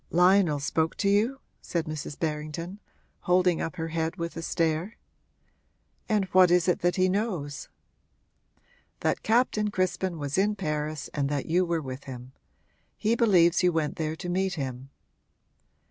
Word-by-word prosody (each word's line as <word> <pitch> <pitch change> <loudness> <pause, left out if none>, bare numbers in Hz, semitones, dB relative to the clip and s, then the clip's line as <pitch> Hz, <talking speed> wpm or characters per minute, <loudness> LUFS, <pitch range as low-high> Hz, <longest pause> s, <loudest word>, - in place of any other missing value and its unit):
'Lionel 180 -3 +4
spoke 160 +3 0
to 200 - +1
you?' 225 +7 +1 0.2
said 170 -2 -2
Mrs. 155 -2 -6
Berrington, 160 +4 -4 0.5
holding 180 -1 +3
up 165 - -3
her 165 -2 -4
head 160 +1 -2
with 170 -2 -5
a 165 - -4
stare. 165 +4 -1 1.1
'And 210 -3 +2
what 185 -1 +6
is 175 0 +3
it 180 - +2
that 175 0 +1
he 185 0 +3
knows?' 185 -8 -2 1.3
'That - - 0
Captain 220 -2 +2
Crispin 185 -2 -1
was 145 +3 -2
in 210 +2 +2
Paris 150 -4 -3
and 140 -2 -1
that 145 -2 -2
you 180 +3 +2
were 170 -2 -1
with 130 0 -7
him. 125 -1 -9 0.7
He 220 - +1
believes 180 -7 +4
you 180 -1 +4
went 160 -3 -1
there 155 -1 -2
to 175 - -7
meet 185 +1 0
him.' 130 -3 -5
170 Hz, 155 wpm, -27 LUFS, 155-190 Hz, 1.3 s, what